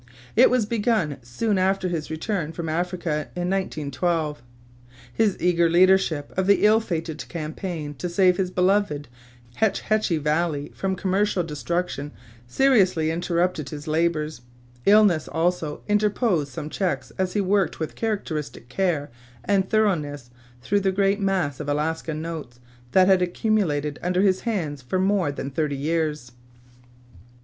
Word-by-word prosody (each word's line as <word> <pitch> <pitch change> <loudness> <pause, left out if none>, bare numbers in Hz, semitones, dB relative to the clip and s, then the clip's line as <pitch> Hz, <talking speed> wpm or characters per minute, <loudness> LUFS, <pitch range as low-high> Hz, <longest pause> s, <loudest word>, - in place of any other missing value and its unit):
It 245 - +7
was 250 -4 +2
begun 210 - 0
soon 190 - -1
after 190 0 +1
his 165 -4 -3
return 160 0 -3
from 170 -1 -5
Africa 170 -2 -2
in 180 +1 -1
1912. 155 -4 -1 0.7
His 205 - +1
eager 170 -1 +3
leadership 175 -4 +3
of 190 0 0
the 200 +1 +4
ill 215 +1 +6
fated 165 -7 -4
campaign 160 -1 -5
to 180 - -3
save 180 0 +3
his 185 -2 0
beloved 185 -5 +1 0.5
Hetch 220 -2 +1
Hetchy 215 -6 +1
Valley 150 -1 -1
from 190 -1 -2
commercial 190 0 0
destruction 160 -1 -3 0.3
seriously 185 - +3
interrupted 170 -3 -1
his 150 +2 -8
labors. 155 -3 0 0.5
Illness, 200 -6 +5
also, 165 -2 -1
interposed 210 - +1
some 155 -2 -6
checks 145 -9 -2
as 185 -1 0
he 210 - +1
worked 195 0 +1
with 160 - -3
characteristic 160 - -4
care 160 -4 -1 0.3
and 195 -2 +1
thoroughness 150 - 0 0.3
through 205 +7 +2
the 195 -1 +1
great 195 +1 +1
mass 185 -9 0
of 150 -1 -4
Alaska 160 +2 -1
notes 155 -6 -6 0.3
that 185 -1 +6
had 190 -1 +5
accumulated 175 -6 0
under 180 +2 +1
his 190 -2 +3
hands 155 -10 -2
for 130 +9 -2
more 190 -4 +2
than 140 0 -5
thirty 145 0 -1
years. 150 -3 -1
175 Hz, 140 wpm, -24 LUFS, 150-195 Hz, 0.7 s, It